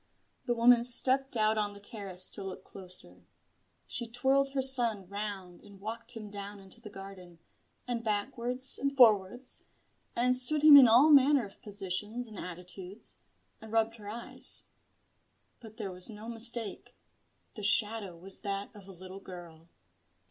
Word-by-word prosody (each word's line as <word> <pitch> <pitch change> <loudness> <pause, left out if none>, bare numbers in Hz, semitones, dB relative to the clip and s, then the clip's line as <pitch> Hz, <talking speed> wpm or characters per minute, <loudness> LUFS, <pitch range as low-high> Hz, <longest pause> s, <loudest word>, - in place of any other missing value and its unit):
The 240 -3 -2
woman 235 0 +3
stepped 255 +1 +7
out 215 0 0
on 205 -1 -4
the 200 - -14
terrace 200 -4 0
to 200 - -5
look 190 -1 -9
closer. 180 - -12 0.6
She 240 - -2
twirled 270 +3 -1
her 270 - -2
son 235 -7 +1
round 200 -3 -8
and 200 -1 -18
walked 230 +3 -5
him 215 -2 -11
down 205 0 -8
into 195 +4 -1
the 215 - -12
garden, 195 -3 -13 0.5
and 235 -2 -5
backwards 240 +4 -3
and 275 0 -4
forwards, 230 +1 +1 0.5
and 250 +1 0
stood 290 +4 +2
him 305 -2 +8
in 270 -3 +8
all 250 +7 +4
manner 280 -3 +3
of 195 - -17
positions 210 +3 -7
and 215 -3 -12
attitudes, 180 +3 -9 0.4
and 220 -1 -13
rubbed 225 0 -1
her 205 -2 -11
eyes. 235 +3 -3 1.0
But 220 -2 -16
there 195 - -7
was 180 +2 -3
no 215 0 -12
mistake: 235 -1 +4 0.6
the 215 - -11
shadow 205 -3 -1
was 190 +3 -11
that 200 +1 -6
of 200 -2 -15
a - - -12
little 185 +1 -12
girl. 170 -3 -14
215 Hz, 155 wpm, -29 LUFS, 195-240 Hz, 1.0 s, him